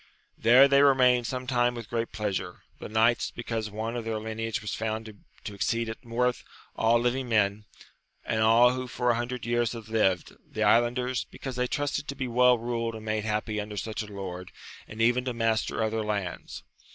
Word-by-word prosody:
There 125 Hz, +5 st, +6 dB
they 140 Hz, 0 st, +5 dB
remained 125 Hz, -4 st, +4 dB
some 130 Hz, +1 st, -4 dB
time 120 Hz, -1 st, +1 dB
with 115 Hz, -3 st, -7 dB
great 115 Hz, -1 st, -2 dB
pleasure; 100 Hz, -4 st, -4 dB, 0.2 s
the -, -, -7 dB
knights, 115 Hz, +2 st, +2 dB
because 115 Hz, -2 st, -4 dB
one 110 Hz, +3 st, -4 dB
of 120 Hz, -, -3 dB
their 110 Hz, -1 st, -2 dB
lineage 110 Hz, 0 st, -3 dB
was 105 Hz, -2 st, -5 dB
found 110 Hz, 0 st, -3 dB, 0.3 s
to 105 Hz, -, -6 dB
exceed 115 Hz, +3 st, -1 dB
in 115 Hz, +2 st, -9 dB
worth 125 Hz, +1 st, 0 dB, 0.3 s
aU 115 Hz, +1 st, +3 dB
living 125 Hz, +2 st, -1 dB
men, 105 Hz, -1 st, +1 dB, 0.6 s
and 110 Hz, -1 st, 0 dB
all 115 Hz, +2 st, +6 dB
who 130 Hz, 0 st, -4 dB
for 125 Hz, 0 st, 0 dB
a -, -, +1 dB
hundred 120 Hz, +1 st, -4 dB
years 120 Hz, 0 st, 0 dB
had 115 Hz, -2 st, -9 dB
lived: 95 Hz, -5 st, 0 dB
the 110 Hz, -, -4 dB
islanders, 120 Hz, +4 st, +2 dB
because 130 Hz, -2 st, -7 dB
they 125 Hz, 0 st, 0 dB
trusted 145 Hz, +2 st, -2 dB
to 140 Hz, -, -4 dB
be 130 Hz, -2 st, -3 dB
well 125 Hz, +1 st, +4 dB
ruled 115 Hz, -1 st, -3 dB
and 110 Hz, 0 st, -9 dB
made 110 Hz, 0 st, -1 dB
happy 105 Hz, 0 st, -1 dB
under 105 Hz, 0 st, -7 dB
such 110 Hz, +2 st, -3 dB
a 105 Hz, -, -7 dB
lord, 95 Hz, -2 st, -7 dB, 0.4 s
and 110 Hz, +1 st, -3 dB
even 120 Hz, +2 st, +3 dB
to 125 Hz, -2 st, -3 dB
master 115 Hz, -1 st, 0 dB
other 110 Hz, 0 st, -1 dB
lands. 100 Hz, -4 st, -4 dB
115 Hz, 195 wpm, -27 LUFS, 110-125 Hz, 0.6 s, There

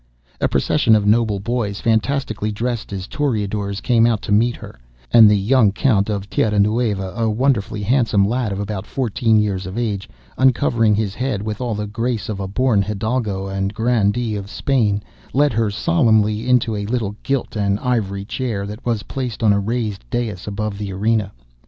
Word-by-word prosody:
A -, -, +2 dB
procession 110 Hz, -, +3 dB
of 105 Hz, -1 st, +1 dB
noble 105 Hz, -1 st, +2 dB
boys, 105 Hz, -2 st, -2 dB
fantastically 110 Hz, -1 st, 0 dB
dressed 115 Hz, +1 st, -3 dB
as 95 Hz, -2 st, -4 dB
toreadors, 105 Hz, -7 st, -2 dB
came 115 Hz, -2 st, +3 dB
out 115 Hz, -3 st, 0 dB
to -, -, -4 dB
meet 115 Hz, +4 st, +3 dB
her, -, -, -12 dB, 0.3 s
and 115 Hz, -3 st, +9 dB
the 105 Hz, -, +4 dB
young 110 Hz, +1 st, +3 dB
Count 110 Hz, -2 st, +1 dB
of 100 Hz, -2 st, -3 dB
Tierra 105 Hz, 0 st, 0 dB
Nueva, 105 Hz, -2 st, +1 dB
a 115 Hz, -1 st, 0 dB
wonderfully 110 Hz, -3 st, 0 dB
handsome 110 Hz, -4 st, +2 dB
lad 120 Hz, -1 st, -1 dB
of 100 Hz, -, -3 dB
about 100 Hz, -1 st, -4 dB
fourteen 120 Hz, -3 st, +1 dB
years 100 Hz, -3 st, -1 dB
of 95 Hz, +4 st, -6 dB
age, 105 Hz, -5 st, -2 dB, 0.3 s
uncovering 120 Hz, -4 st, +3 dB
his 105 Hz, -2 st, -1 dB
head 120 Hz, -4 st, -2 dB
with 110 Hz, +2 st, -4 dB
all 120 Hz, -3 st, -1 dB
the 105 Hz, 0 st, -3 dB
grace 115 Hz, +1 st, -3 dB
of 105 Hz, -2 st, -3 dB
a 95 Hz, -, -3 dB
born 110 Hz, +1 st, +2 dB
hidalgo 105 Hz, -1 st, -2 dB
and 95 Hz, +1 st, -3 dB
grandee 115 Hz, -1 st, +1 dB
of 100 Hz, -1 st, -6 dB
Spain, 105 Hz, -6 st, 0 dB, 0.3 s
led 145 Hz, 0 st, +3 dB
her 110 Hz, -1 st, +1 dB
solemnly 110 Hz, -4 st, +2 dB
in 125 Hz, -, +6 dB
to 115 Hz, -2 st, -2 dB
a 100 Hz, 0 st, -3 dB
little 110 Hz, -3 st, -2 dB
gilt 135 Hz, -3 st, -2 dB
and 100 Hz, -1 st, 0 dB
ivory 100 Hz, -6 st, -1 dB
chair 110 Hz, -4 st, -3 dB
that 105 Hz, +5 st, -8 dB
was 115 Hz, -3 st, -1 dB
placed 125 Hz, -4 st, -5 dB
on 105 Hz, -2 st, +5 dB
a 100 Hz, -, +2 dB
raised 110 Hz, -, -2 dB
dais 110 Hz, -7 st, -3 dB
above 105 Hz, 0 st, -3 dB
the 100 Hz, -2 st, -4 dB
arena. 105 Hz, +1 st, 0 dB
110 Hz, 185 wpm, -20 LUFS, 100-120 Hz, 0.3 s, and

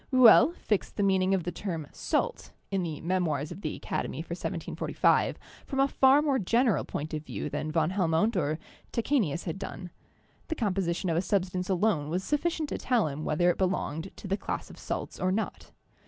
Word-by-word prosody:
Rouelle 255 Hz, +4 st, +8 dB
fixed 210 Hz, -3 st, -1 dB
the 205 Hz, -, 0 dB
meaning 190 Hz, -1 st, +3 dB
of 185 Hz, -, -1 dB
the 175 Hz, -, -3 dB
term 165 Hz, -4 st, -4 dB
"salt" 485 Hz, -, -2 dB, 0.2 s
(in 195 Hz, -1 st, +1 dB
the 160 Hz, -4 st, -4 dB
'Memoirs' 165 Hz, -4 st, 0 dB
of 175 Hz, +3 st, -8 dB
the -, -, -3 dB
Academy -, -, -3 dB
for -, -, -15 dB
1745) -, -, 0 dB, 0.3 s
from 270 Hz, -, -2 dB
a 275 Hz, -, +5 dB
far 275 Hz, +2 st, +5 dB
more 275 Hz, -3 st, +2 dB
general 230 Hz, +3 st, +2 dB
point 155 Hz, +3 st, -5 dB
of 155 Hz, -1 st, -3 dB
view -, -, -5 dB
than 155 Hz, -, -2 dB
van 160 Hz, +1 st, +1 dB
Helmont 185 Hz, +3 st, +2 dB
or 155 Hz, -3 st, 0 dB, 0.3 s
Tachenius 225 Hz, -, 0 dB
had 175 Hz, +1 st, -4 dB
done. 180 Hz, -2 st, -7 dB, 0.6 s
The 320 Hz, -, -2 dB
composition 185 Hz, -, 0 dB
of 160 Hz, -, +1 dB
a -, -, +3 dB
substance 185 Hz, -1 st, -1 dB
alone 185 Hz, -6 st, +1 dB
was 180 Hz, +4 st, -1 dB
sufficient 310 Hz, -, 0 dB
to -, -, -3 dB
tell 240 Hz, -8 st, +2 dB
him 145 Hz, +2 st, -5 dB
whether 175 Hz, +3 st, +3 dB
it -, -, -6 dB
belonged 180 Hz, -2 st, -1 dB
to -, -, -9 dB
the 195 Hz, +1 st, 0 dB
class -, -, -4 dB
of -, -, -13 dB
salts -, -, -4 dB
or 185 Hz, -, +1 dB
not. 215 Hz, +3 st, -3 dB
185 Hz, 195 wpm, -29 LUFS, 165-220 Hz, 0.6 s, Rouelle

